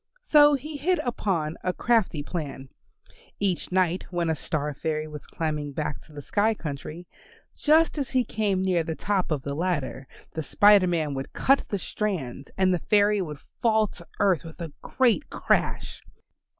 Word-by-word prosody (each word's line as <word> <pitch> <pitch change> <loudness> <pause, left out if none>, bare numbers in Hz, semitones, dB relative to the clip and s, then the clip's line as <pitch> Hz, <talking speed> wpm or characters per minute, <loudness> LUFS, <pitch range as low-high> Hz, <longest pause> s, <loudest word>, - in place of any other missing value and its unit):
So 295 -8 +6
he 295 +3 -6
hit 355 +6 +1
upon 175 -10 -1
a 180 - 0
crafty 220 -12 +1
plan. 145 -5 -5 0.7
Each 190 -3 -1
night 185 -1 +1
when 175 -2 0
a - - 0
Star 150 0 -2
fairy 155 +1 -2
was 150 -1 -9
climbing 150 -3 -3
back 150 -1 -3
to - - -18
the 145 -1 -9
sky 215 +6 +1
country, 155 +1 -6 0.5
just 315 +1 +3
as 275 - -2
he 255 -1 +2
came 205 -5 0
near 185 -3 +2
the 160 0 -4
top 195 0 -1
of 150 -4 -1
the 140 - -3
ladder, 145 -5 -2 0.3
the 160 - -2
Spider 205 +3 +5
Man 160 -4 0
would 135 0 -5
cut 275 +1 +2
the 200 - -1
strands 165 - -3
and 185 -1 +3
the 180 - +1
fairy 205 +2 +3
would 150 -5 -6 0.2
fall 220 -2 +4
to 170 - -13
earth 190 -6 +3
with 165 +1 -11
a 165 -4 -6
great 260 +2 +1
crash. - - -1
180 Hz, 175 wpm, -26 LUFS, 150-210 Hz, 0.7 s, So